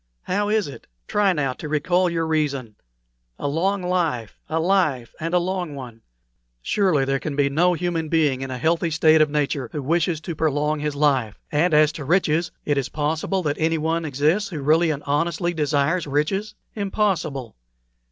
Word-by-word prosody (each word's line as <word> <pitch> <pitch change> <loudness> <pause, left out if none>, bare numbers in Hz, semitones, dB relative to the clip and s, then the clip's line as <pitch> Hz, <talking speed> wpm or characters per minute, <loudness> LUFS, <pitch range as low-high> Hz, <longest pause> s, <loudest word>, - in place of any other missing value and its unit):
How 205 +2 -1
is 215 -3 +1
it! 140 - -11 0.2
Try 205 -2 +2
now 145 -6 0
to 150 - -8
recall 175 +5 +2
your 165 -1 -1
reason. 145 -7 -1 0.6
A - - -3
long 185 +6 0
life 165 - -1
a 160 +1 0
life, 160 - +1
and 165 +1 -3
a - - +6
long 180 -3 -2
one! 120 -4 -9 0.6
Surely 180 - +2
there 135 0 0
can 145 0 -4
be 140 -1 +2
no 175 +5 +3
human 165 -2 -2
being 150 -5 +2
in 135 - -4
a 130 - -4
healthy 165 +5 +1
state 160 0 +4
of 155 - +4
nature 145 -4 -1
who 150 - -4
wishes 165 +2 +1
to 165 +1 -5
prolong 150 0 0
his 150 -1 -2
life; 135 -7 +1
and 160 +4 +2
as 155 0 +5
to 155 - -7
riches, 165 +1 +2 0.2
it 145 -2 +1
is 135 - -3
possible 155 +5 -1
that 145 -2 -1
anyone 165 +1 0
exists 155 +8 +1
who 165 -5 -5
really 160 +3 +4
and 145 -2 -2
honestly 165 +4 0
desires 150 +2 0
riches? 175 +9 -1 0.2
Impossible! 185 - -1
155 Hz, 180 wpm, -23 LUFS, 145-175 Hz, 0.6 s, a